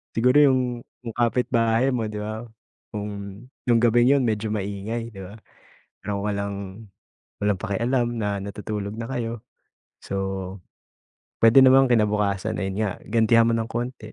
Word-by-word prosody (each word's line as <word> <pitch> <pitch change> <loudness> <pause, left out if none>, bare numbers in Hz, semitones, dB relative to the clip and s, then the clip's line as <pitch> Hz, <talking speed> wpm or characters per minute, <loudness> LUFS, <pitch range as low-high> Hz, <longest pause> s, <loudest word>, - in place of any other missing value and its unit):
Siguro 125 +5 +4
'yung 135 -3 +5 0.5
yung 115 - -5
kapitbahay 120 +1 +2
mo 110 -3 -1
'di 105 - -6
ba, 110 +1 -4 0.5
kung 100 +1 -7 0.2
'yung 115 - +5
gabing 120 +2 +4
'yon 140 -2 +4
medyo 110 -1 -1
maingay 105 +3 -4
'di 95 - -9
ba, 100 +4 -10 0.6
pero 100 -1 -4
walang 100 0 -4 0.5
walang 105 -2 0
pakialam 120 +4 0
na 105 -2 -2
natutulog 105 +1 -5
na 115 - -4
kayo. 115 -1 -4 0.6
So, - - -9 1.3
pwede 115 +4 +8
namang 130 0 +6
kinabukasan 105 -1 +1
ayan 95 -1 -3
nga, 105 -3 0
gantihan 115 0 +4
mo 115 - +2
nang 115 0 -1
kaunti. 120 +2 -4
110 Hz, 140 wpm, -24 LUFS, 100-120 Hz, 1.3 s, pwede